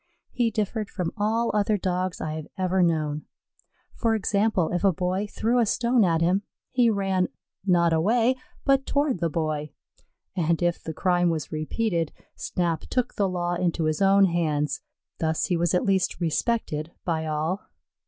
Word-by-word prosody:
He 240 -2 +1
differed 215 -1 -2
from 180 -4 -3
all 225 +2 +1
other 210 0 +2
Dogs 185 -1 -2
I 155 - -3
have 155 -1 -6
ever 185 0 +1
known. 155 -3 0 0.7
For 225 -2 +1
example, 200 -4 +1
if 175 - -1
a 195 - +5
boy 185 +3 -1
threw 230 +4 0
a 235 - +4
stone 235 +1 +3
at 165 -3 +2
him, 180 +4 +3 0.3
he 245 -2 +4
ran, 195 -3 +1 0.4
not 170 -2 +4
away, 225 +9 +3 0.3
but 275 -1 +3
toward 285 - +1
the 170 -1 0
boy, 155 -1 -2 0.7
and 170 -2 +1
if 175 -1 +1
the 160 - -5
crime 175 -1 +2
was 160 -3 -3
repeated, 165 +2 -1 0.2
Snap 170 -3 -1
took 250 -1 0
the 200 -2 +1
law 175 -1 -1
into 175 -1 0
his 155 +1 0
own 195 0 +6
hands; 155 -4 0 0.4
thus 160 -1 0
he 180 - 0
was 170 +1 +1
at 180 - +1
least 190 -3 +1
respected 165 -2 -1
by 160 -2 -1
all. 155 +6 -2
180 Hz, 165 wpm, -26 LUFS, 165-210 Hz, 0.7 s, own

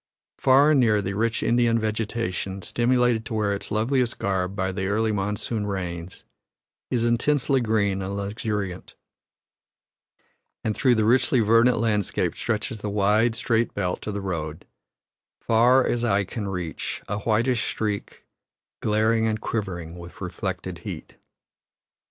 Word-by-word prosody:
Far 135 +3 +5
and 145 - +4
near 110 -4 +4
the 100 0 -3
rich 115 +3 0
Indian 120 -1 +3
vegetation, 110 -4 -2
stimulated 120 -1 +2
to 115 - -4
wear 105 -2 +1
its 100 - -4
loveliest 120 +3 +1
garb 95 -1 -1
by 95 -1 -1
the 95 0 -3
early 110 +2 +1
monsoon 105 +1 -2
rains, 90 -3 -5 0.7
is 120 -2 0
intensely 130 +3 +2
green 105 -4 +1
and 100 +1 -4
luxuriant; 100 -2 -4 1.7
and 110 - -1
through 130 -3 +3
the 110 -1 +2
richly 125 +3 +3
verdant 115 +2 +4
landscape 105 -3 0
stretches 110 -1 -2
the 105 - -3
wide, 105 +3 +2
straight 115 0 0
belt 90 -1 -2
of 105 - -3
the 100 - -3
road, 80 -5 -4 0.7
far 125 +3 +4
as 120 0 0
eye 100 -3 +2
can 100 +2 -5
reach, 90 -4 -4
a 105 +1 -2
whitish 115 +3 +1
streak, 105 -2 -4 0.6
glaring 110 +1 +2
and 110 -1 -1
quivering 90 -8 -4
with 85 0 -11
reflected - - -4
heat. - - -8
110 Hz, 140 wpm, -25 LUFS, 100-115 Hz, 1.7 s, Far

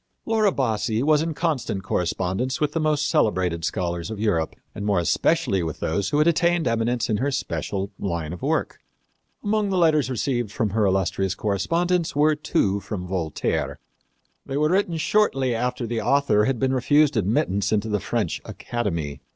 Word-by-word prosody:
Laura 220 -3 +2
Bassi 115 - 0
was 150 0 +4
in 160 -1 -2
constant 140 - -1
correspondence 95 +7 -1
with 150 - +1
the 165 - -1
most 150 -1 +1
celebrated 95 - +1
scholars 85 0 -2
of 110 -2 -6
Europe, 100 -7 0 0.2
and 100 - -6
more 100 -2 +1
especially 90 +2 +1
with 80 -3 -4
those 95 +5 -1
who 145 - 0
had 150 - +4
attained 170 -1 +2
eminence 115 +1 0
in 110 - 0
her 135 +6 0
special 105 -7 -3
line 85 -4 -3
of 90 - -9
work. - - -1 0.6
Among 210 0 +1
the 190 - 0
letters 155 -6 +3
received 120 -3 -1
from 110 -3 -1
her 105 0 +2
illustrious 95 0 0
correspondents 165 - 0
were 150 +2 +4
two 145 - 0
from 100 -3 -5
Voltaire. 90 -4 -2 0.7
They 135 - -4
were 150 +1 +2
written 185 -2 +1
shortly 145 - +2
after 125 +1 -2
the 115 0 -2
author 135 -7 +3
had 135 0 0
been 130 +2 +1
refused 145 +3 +3
admittance 100 -1 +1
into 110 0 +1
the 105 -1 0
French - - -2
academy. 85 -12 -4
115 Hz, 170 wpm, -24 LUFS, 95-150 Hz, 0.7 s, was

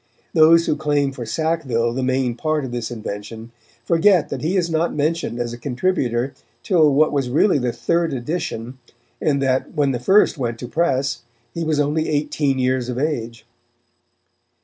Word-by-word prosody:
Those 165 +1 +6
who - - +1
claim 145 -2 0
for 125 -4 -7
Sackville 130 -6 0
the 130 - -2
main 130 -1 0
part 155 +3 -1
of 125 - -6
this 120 -2 -3
invention, 110 0 -7 0.3
forget 170 - +3
that - - -4
he 175 +5 0
is 175 -2 +1
not 165 +1 0
mentioned 150 -4 -1
as 120 -1 -3
a 120 - -8
contributor 130 -2 -1 0.3
till 160 -6 +4
what 155 +3 +3
was 135 -3 -1
really 150 +5 +3
the 125 -1 -1
third 170 +5 0
edition, 130 -3 -4 0.4
and 140 -2 +1
that, 130 +3 0
when 145 -3 +2
the 125 - -2
first 190 - +3
went 120 -3 -2
to 125 - -7
press, 135 -4 0 0.3
he 170 - -3
was 155 -2 0
only 150 +2 0
eighteen 145 -2 0
years 130 -1 0
of 125 - -3
age. 120 -6 -3
140 Hz, 170 wpm, -21 LUFS, 120-160 Hz, 0.4 s, Those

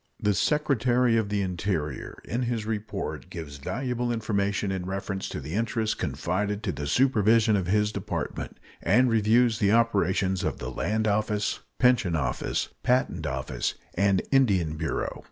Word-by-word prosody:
The 105 - +2
Secretary 125 -2 +2
of 110 -3 +1
the 100 -1 0
Interior 90 -4 -3
in 120 +3 -2
his 120 -3 -1
report 110 -1 -4
gives 75 -4 -7
valuable 120 - -2
information 100 -3 0
in 95 -1 -3
reference 95 0 -3
to - - -4
the 75 +3 -7
interests 110 +1 0
confided 95 - -2
to 95 - 0
the 75 -4 -5
supervision 110 - +4
of 95 -3 -1
his 105 +2 +2
Department, - - -4 0.2
and 125 -1 +4
reviews 115 +1 +3
the 100 -1 +3
operations 95 -4 +2
of - - -1
the 65 +1 -5
Land 110 +10 -1
Office, 105 0 0 0.2
Pension 125 -9 +3
Office, 65 -5 -1
Patent 125 +1 +1
Office, 65 0 -2 0.2
and 100 0 +2
Indian 100 - +3
Bureau. 80 -1 -3
105 Hz, 150 wpm, -27 LUFS, 95-115 Hz, 0.2 s, supervision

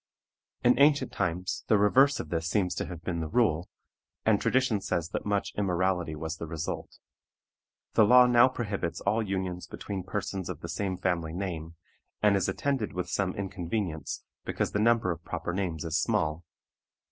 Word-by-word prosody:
In 125 +2 +4
ancient 145 -2 +4
times 90 0 -2
the 110 - +5
reverse 135 +8 +4
of 75 - -5
this 85 0 -1
seems 95 -3 +1
to - - -3
have 85 -2 -8
been 85 -2 -2
the 80 - -2
rule, 90 -6 +2 0.6
and 110 -2 +3
tradition 130 -6 +2
says 85 -3 -2
that 90 - -4
much 100 -1 0
immorality 90 -4 0
was 80 +1 -4
the 85 - -6
result. 80 0 -5 1.0
The 110 - +6
law 125 +4 +8
now 120 0 +6
prohibits 100 -8 -3
all 105 +3 +1
unions 95 -3 -3
between 100 -2 -5
persons 95 0 -4
of - - -6
the 85 - -6
same 95 +2 -2
family 85 -3 -1
name, 85 -3 -4 0.4
and 105 -1 +4
is 95 -1 +1
attended 130 +2 -1
with 90 0 -3
some 95 -2 0
inconvenience, 90 -4 -3 0.2
because - - -2
the 105 - 0
number 115 -4 +3
of 85 0 -6
proper 85 +1 -4
names 90 -5 -2
is 80 0 +1
small. 75 +2 0
95 Hz, 170 wpm, -29 LUFS, 85-105 Hz, 1.0 s, law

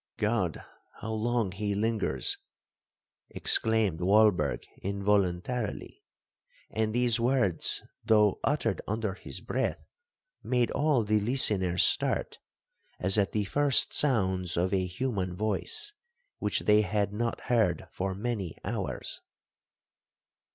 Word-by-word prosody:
'God!—how 110 +1 -3
long 115 -2 0
he 100 +1 -3
lingers!' 105 - -1 0.9
exclaimed 110 -7 +1
Walberg 95 -5 +3 0.2
involuntarily; 100 +3 -1 0.7
and 110 0 -1
these 120 0 +2
words, 115 -8 +2 0.2
though 105 -3 +3
uttered 120 -8 0
under 110 -1 -2
his 95 - -6
breath, - - -2 0.6
made 125 -2 0
all 145 -5 +1
the 105 0 +2
listeners 100 -6 +4
start, - - 0 0.6
as 95 +3 +1
at 100 - +1
the 105 - 0
first 145 +6 +2
sounds 95 - +1
of 90 +3 0
a 95 -1 +1
human 95 -3 -3
voice, 110 - 0 0.5
which - - -1
they 105 0 +4
had 105 0 -1
not 115 +2 -2
heard 110 -9 +1
for 95 0 -3
many 100 -5 -4
hours. - - -4
105 Hz, 110 wpm, -29 LUFS, 95-115 Hz, 0.9 s, listeners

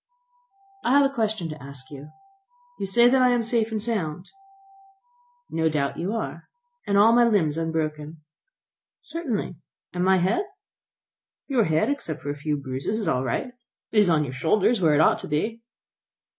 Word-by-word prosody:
"I 255 +4 +4
have 285 - +5
a 275 - -1
question 220 -7 -1
to 155 -2 -8
ask 135 0 -9
you. 145 +1 -10 0.7
You - - -2
say 235 +5 +5
that 260 +1 +4
I 250 - +5
am 245 -1 +2
safe 225 -1 +1
and 220 - -1
sound?" 185 -6 -3 1.2
"No 160 0 +1
doubt 140 -3 -2
you 185 +6 -2
are." 225 - -5 0.4
"And 200 - +2
all 220 +3 +6
my 240 0 +6
limbs 195 -10 +2
unbroken?" 160 -1 -3 0.9
"Certainly." 255 - -4 0.4
"And 180 0 -1
my 190 0 +4
head?" 190 - +1 1.0
"Your 250 -6 +2
head, 160 - +1
except 165 - -5
for 145 - -2
a - - -5
few 150 +1 -2
bruises, 135 +8 -3
is 215 -5 -3
all 130 -4 +1
right; 125 - -1
and 250 -1 -12 0.4
it 220 - +3
is 205 -3 +4
on 155 -2 +3
your 130 -3 -5
shoulders, 190 - +2
where 155 -3 +4
it 150 - +4
ought - - +4
to - - -8
be." 215 +10 -2
180 Hz, 180 wpm, -24 LUFS, 150-230 Hz, 1.2 s, all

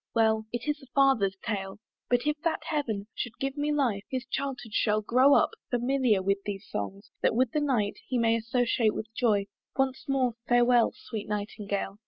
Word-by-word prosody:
Well 220 -1 +3
It 240 +2 -4
is 295 0 -1
a 270 - -15
father's 250 -9 +3
tale. 195 -4 -3 0.3
But 245 +1 +2
if 300 0 +2
that 330 0 -1
Heaven 230 -10 -2
Should 245 -1 -5
give 270 0 -2
me 295 0 0
life, 250 -9 +1
his 260 -2 -3
childhood 255 -4 -4
shall 215 -1 +2
grow 255 +6 +5
up - - +4 0.2
Familiar 245 -4 +2
with 195 +1 +1
these 200 -1 -5
songs, 195 - -5
that - - +2
with 250 -1 +2
the 300 - 0
night 240 -8 0
He 255 - 0
may 230 -1 +3
associate 230 -1 +1 0.2
Joy! 215 -5 +2 0.3
Once 265 +1 0
more 260 -3 +1
farewell, 240 -1 +4
Sweet 215 -2 -7
Nightingale! 205 -1 -3
240 Hz, 180 wpm, -28 LUFS, 210-265 Hz, 0.3 s, grow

